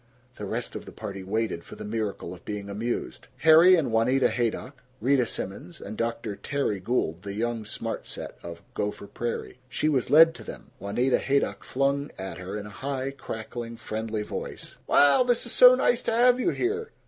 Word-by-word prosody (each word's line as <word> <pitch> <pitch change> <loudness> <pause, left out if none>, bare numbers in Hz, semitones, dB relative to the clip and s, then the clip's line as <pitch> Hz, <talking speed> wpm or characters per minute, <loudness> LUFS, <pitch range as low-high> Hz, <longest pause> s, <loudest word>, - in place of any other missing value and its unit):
The 105 - -5
rest - - -3
of - - -6
the - - -10
party 100 -3 -6
waited 100 -2 -2
for - - -11
the - - -8
miracle 105 -5 -3
of 90 - -13
being 105 -1 -5
amused. 115 +4 -4
Harry 165 +4 +8
and 155 -8 0
Juanita 125 +4 +3
Haydock, 125 +3 -2 0.2
Rita 130 -1 +3
Simons 95 -4 -6
and 105 - -7
Dr. 115 -2 -2
Terry 135 -7 -2
Gould 90 -5 -1
the 100 0 -6
young 115 0 -2
smart 105 - -5
set - - -7
of 85 -1 -9
Gopher 105 0 -3
Prairie. 120 +3 -5
She 155 - 0
was 135 -5 +1
led 165 +2 +8
to - - -11
them. - - -10
Juanita 120 +7 +1
Haydock 140 +1 0
flung 140 +2 0
at 95 -1 -6
her 95 +3 -5
in 105 - -6
a 105 - -9
high, 135 +4 -3
cackling, 115 -2 -7
friendly 110 -1 -3
voice: - - -7
"Well, 145 - +6
this 245 -1 +1
is - - -5
SO - - +8
nice - - +2
to - - -1
have 245 +2 +5
you 255 - +2
here. 430 +6 -1
115 Hz, 190 wpm, -27 LUFS, 105-140 Hz, 0.2 s, Harry